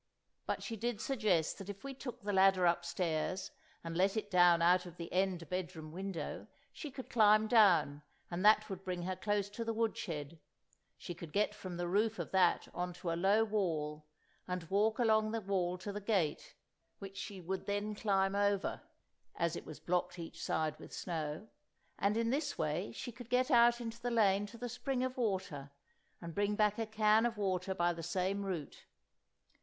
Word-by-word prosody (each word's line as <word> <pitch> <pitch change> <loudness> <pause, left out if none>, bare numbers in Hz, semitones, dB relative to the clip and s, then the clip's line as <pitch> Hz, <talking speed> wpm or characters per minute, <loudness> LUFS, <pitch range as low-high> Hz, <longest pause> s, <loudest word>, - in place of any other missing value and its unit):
But - - -2
she 230 - -4
did 235 0 -2
suggest 215 - +1
that 195 0 -8
if 200 -1 -7
we 275 0 -5
just 265 - -17
took 245 -2 -6
the 205 0 -1
ladder 190 -1 +5
upstairs 175 +1 0 0.3
and 165 0 -5
let 195 +4 +2
it 210 -1 -3
down 175 -2 +6
out 180 +2 +4
of 175 0 -12
the 170 -1 -7
end 180 -3 0
bedroom 165 -3 -4
window 185 -2 -5 0.3
she 300 - -6
could 260 -1 -8
climb 215 -1 +5
down, 190 -10 +5 0.3
and 175 +2 -2
that 215 0 +6
would 195 -2 -6
bring 180 -2 -3
her 185 +1 -2
close 205 0 0
to 230 - -4
the 225 -1 -2
wood 225 -1 +1
shed; 160 -2 -5 0.6
she 175 - -6
could 170 -2 -9
get 210 +2 +1
from 185 -4 -7
the 175 0 -2
roof 215 +4 +1
of - - -5
that 185 -2 +3
on 180 0 -3
to 175 -1 -4
a - - 0
low 205 +4 +4
wall, 155 -8 -2 0.4
and 180 -1 -3
walk 215 +3 +3
along 220 -2 +3
the 225 +1 -1
wall 185 -2 0
to 190 +3 -5
the 205 +1 -5
gate, 190 -8 -1 0.4
which 195 -1 -9
she 195 0 -6
would 185 +2 -4
then 205 +1 -1
climb 195 -2 +1
over 200 -1 +1 0.5
(as 170 0 0
it - - -7
was 155 - -8
blocked 180 0 -1
each 165 -1 -8
side 155 -1 -1
with - - -11
snow), 160 +2 -4 0.5
and 200 +2 +2
in 230 0 +1
this 285 +3 -1
way 155 +6 -1
she 245 - -6
could 240 0 -11
get 255 +3 +2
out 240 0 +6
into 235 0 -6
the 245 - -1
lane 205 -3 +3
to 230 - -11
the 245 +1 -4
spring 250 +2 -2
of 255 0 -2
water, 190 - -2 0.5
and 170 -1 -7
bring 205 +2 +1
back 210 0 +2
a 225 - -1
can 215 0 +4
of 235 -2 0
water 190 -1 -1
by 175 -1 +2
the 165 - -7
same 185 +4 -1
route. 180 -7 -5
195 Hz, 200 wpm, -34 LUFS, 175-215 Hz, 0.6 s, down